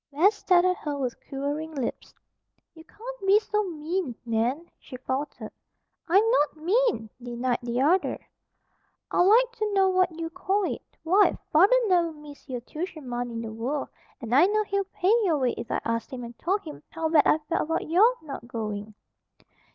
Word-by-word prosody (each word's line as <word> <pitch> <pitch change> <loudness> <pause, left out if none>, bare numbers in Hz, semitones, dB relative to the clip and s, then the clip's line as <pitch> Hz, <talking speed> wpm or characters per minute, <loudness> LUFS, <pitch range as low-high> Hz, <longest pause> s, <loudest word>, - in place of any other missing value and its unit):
Bess 345 +9 +4
stared 360 -3 +3
at 365 0 +2
her 295 -2 -4
with 255 -3 -2 0.2
quivering 290 +3 -4
lips. 265 -4 -4 0.6
"You 320 - -14
can't - - -10
be 395 +2 +7
so 425 0 0
mean, 325 -4 -3
Nan," 240 +8 0
she 255 - -10
faltered. 265 +3 -4 0.6
"I'm 390 +5 +5
not 300 -8 +2
mean!" 375 - +1
denied 245 0 -2
the 240 +1 -2
other. 355 +7 +2 0.9
"I'd - - +3
like 460 +7 +5
to 430 -2 -1
know 385 -1 +4
what 370 -3 +1
you 330 0 -4
call 385 +3 0
it? - - -2 0.2
Why, 380 +5 +4
father'd 385 +11 +6
never 350 -4 +2
miss 295 -2 -14
your 250 -2 -4
tuition 310 +1 -7
money 245 0 -3
in 230 - -4
the 220 -1 -6
world. 255 +6 -3 0.3
And 235 -4 -5
I 290 +8 +6
know 430 +1 +1
he'd 395 -1 -2
pay 375 +4 +2
your 335 -6 +2
way 255 -3 +1
if 235 - -7
I - - 0
asked 230 0 -2
him 250 -2 -6
and 235 0 -9
told 390 +4 0
him 305 -2 -9
how 325 0 -2
bad 315 -2 +4
I - - +5
felt 335 - 0
about 325 - -1
your 415 +10 +5
not 275 -5 -8
going." 215 -2 -5
315 Hz, 185 wpm, -26 LUFS, 255-380 Hz, 0.9 s, be